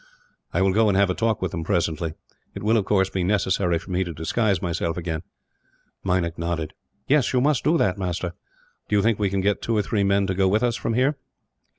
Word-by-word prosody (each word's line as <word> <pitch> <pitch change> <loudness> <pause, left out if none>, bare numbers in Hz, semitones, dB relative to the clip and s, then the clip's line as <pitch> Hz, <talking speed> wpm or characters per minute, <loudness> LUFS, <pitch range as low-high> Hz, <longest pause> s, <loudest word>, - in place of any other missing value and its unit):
"I - - +1
will 95 -1 +3
go 110 +2 +4
and 100 -2 +2
have 100 -2 +3
a - - 0
talk 115 +2 0
with - - -1
them, 85 -3 -4
presently. 80 -1 -1 0.4
It - - -6
will, 110 +2 +3
of 105 -4 +2
course, 95 -2 +2
be 95 - -1
necessary 95 -2 +1
for 95 +3 -9
me 90 +1 +1
to 85 - -5
disguise 95 +5 0
myself 85 -1 -2
again." 80 -2 -3 0.8
Meinik 90 -3 0
nodded. 85 -2 -2 0.3
"Yes, 140 -2 +3
you 125 - +3
must 140 0 +2
do 165 +3 +3
that, 95 - +1
master." 90 -1 -2 0.6
"Do 105 - +1
you 100 - +3
think 110 -2 +2
that - - -4
we 100 - +2
can 95 0 -1
get 100 +1 +1
two 115 -1 0
or 105 - +2
three 100 0 0
men 100 0 +2
to 95 - -1
go 95 +1 +2
with 105 +4 +2
us, 120 -2 +1
from 115 -1 -2
here?" 135 +4 +2
95 Hz, 240 wpm, -24 LUFS, 90-110 Hz, 0.8 s, go